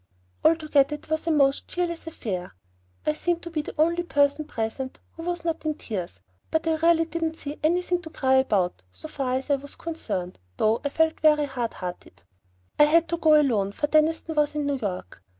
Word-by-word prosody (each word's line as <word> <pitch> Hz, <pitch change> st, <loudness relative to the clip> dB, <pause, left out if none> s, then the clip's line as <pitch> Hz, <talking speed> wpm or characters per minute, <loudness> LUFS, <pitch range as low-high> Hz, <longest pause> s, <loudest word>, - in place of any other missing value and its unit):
Altogether 305 Hz, -3 st, +3 dB
it 295 Hz, -, -14 dB
was 315 Hz, +1 st, -1 dB
a -, -, +3 dB
most 275 Hz, -3 st, +3 dB
cheerless 340 Hz, -2 st, -3 dB
affair. 185 Hz, -, -5 dB, 0.5 s
I 150 Hz, -, +2 dB
seemed 345 Hz, -, -1 dB
to 340 Hz, -, -7 dB
be 310 Hz, -2 st, -1 dB
the -, -, -8 dB
only 335 Hz, +3 st, +3 dB
person 285 Hz, -2 st, +2 dB
present 235 Hz, +2 st, -4 dB
who 330 Hz, -, -10 dB
was 345 Hz, 0 st, -3 dB
not 330 Hz, -1 st, -1 dB
in 310 Hz, -1 st, -1 dB
tears; 185 Hz, -, -5 dB, 0.3 s
but 320 Hz, +1 st, 0 dB
I 320 Hz, -1 st, +2 dB
really 330 Hz, 0 st, +4 dB
didn't 325 Hz, 0 st, -3 dB
see 290 Hz, -1 st, -6 dB
anything 355 Hz, +2 st, +1 dB
to 325 Hz, -, -9 dB
cry 265 Hz, -4 st, +2 dB
about, 195 Hz, -, +1 dB
so 315 Hz, -, -9 dB
far 270 Hz, -4 st, -2 dB
as 265 Hz, +2 st, -2 dB
I 280 Hz, -, +4 dB
was 285 Hz, +1 st, -11 dB
concerned, 200 Hz, -, -4 dB, 0.2 s
though 220 Hz, +2 st, +2 dB
I 285 Hz, -, 0 dB
felt 320 Hz, +2 st, +1 dB
very 300 Hz, -1 st, +4 dB
hard 250 Hz, -4 st, -3 dB
hearted. 175 Hz, -, -8 dB, 0.6 s
I 295 Hz, -, +9 dB
had 330 Hz, +2 st, +4 dB
to 340 Hz, -, 0 dB
go 310 Hz, -2 st, +6 dB
alone, 210 Hz, -9 st, +1 dB
for 295 Hz, -, 0 dB
Deniston 315 Hz, +2 st, +2 dB
was 300 Hz, -1 st, +1 dB
in 295 Hz, -1 st, -1 dB
New 280 Hz, -1 st, -1 dB
York. 185 Hz, -, -5 dB
300 Hz, 205 wpm, -25 LUFS, 260-325 Hz, 0.6 s, I